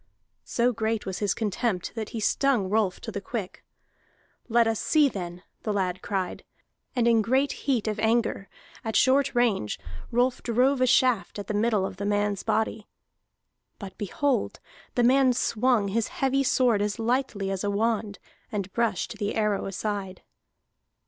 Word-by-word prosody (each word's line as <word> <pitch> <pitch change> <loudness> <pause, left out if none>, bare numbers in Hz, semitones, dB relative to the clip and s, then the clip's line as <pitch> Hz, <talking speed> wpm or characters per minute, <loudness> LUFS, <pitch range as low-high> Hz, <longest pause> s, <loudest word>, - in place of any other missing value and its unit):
So 245 +1 +1
great 220 0 -1
was 190 -1 -4
his 205 -2 0
contempt 210 -3 -2
that 220 -2 -4
he 230 - -5
stung 235 -3 +1
Rolf 210 -4 +1
to - - -6
the 200 - -4
quick. 210 -4 -5 0.9
"Let 235 0 +4
us 225 -1 0
see, 305 -2 +4
then!" 180 -6 -6 0.2
the 215 - -2
lad 185 -3 -1
cried. 190 -3 -3 0.5
And 240 -2 +2
in 230 -1 +5
great 260 +5 +2
heat 250 -6 -1
of 215 0 -2
anger, 225 -2 +1 0.3
at 220 -1 -3
short 270 +1 +3
range, 220 - +1 0.3
Rolf 245 +2 +1
drove 255 +3 +2
a 255 - +4
shaft 245 -5 +2
at 205 - -5
the 210 - -3
middle 210 -2 +2
of 190 - -6
the 200 +1 -3
man's 205 -1 0
body. 220 -1 -1 0.9
But 195 -3 -9
behold! 260 +7 -1 0.4
the 245 - +3
man 260 +1 +5
swung 235 -3 +1
his 225 +3 0
heavy 275 -6 0
sword 245 -5 +3
as 205 +1 -1
lightly 230 -4 -1
as 195 0 -3
a 205 - 0
wand, 215 0 0 0.3
and 200 -3 -4
brushed 230 -6 -1
the 205 0 -2
arrow 210 -3 0
aside! 195 -1 -4
220 Hz, 160 wpm, -26 LUFS, 200-245 Hz, 0.9 s, in